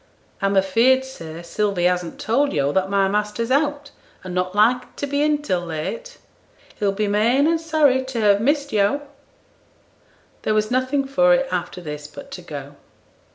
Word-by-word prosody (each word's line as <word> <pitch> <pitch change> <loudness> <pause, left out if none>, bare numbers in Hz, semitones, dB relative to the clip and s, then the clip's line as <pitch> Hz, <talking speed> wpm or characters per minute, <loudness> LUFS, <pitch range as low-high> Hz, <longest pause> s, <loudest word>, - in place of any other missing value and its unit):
'I'm 195 0 +1
afeared, 235 +8 +3
sir, 165 -10 -9
Sylvie 185 +1 -1
hasn't 180 -1 0
told 275 +6 +1
yo' 140 -1 +1
that 190 +3 0
my 195 -1 +2
master's 210 +4 -1
out, 290 0 0 0.3
and 185 -1 -6
not 180 +1 -2
like 245 +4 +2
to - - -3
be 285 +1 -1
in 300 0 +1
till 185 -11 0
late. 470 - -5 0.6
He'll 205 -2 +1
be 210 +2 -1
main 230 +7 +3
and 325 0 +1
sorry 300 -5 +2
to 260 -3 -4
have 205 -2 +4
missed 285 +3 +1
yo'.' 215 +8 +2 1.4
There 215 - 0
was 215 +1 0
nothing 260 +2 +1
for 270 0 +4
it 270 +1 0
after 180 0 -3
this 150 -2 -7
but - - -12
to 180 - -7
go. 145 -4 -8
215 Hz, 170 wpm, -22 LUFS, 185-275 Hz, 1.4 s, have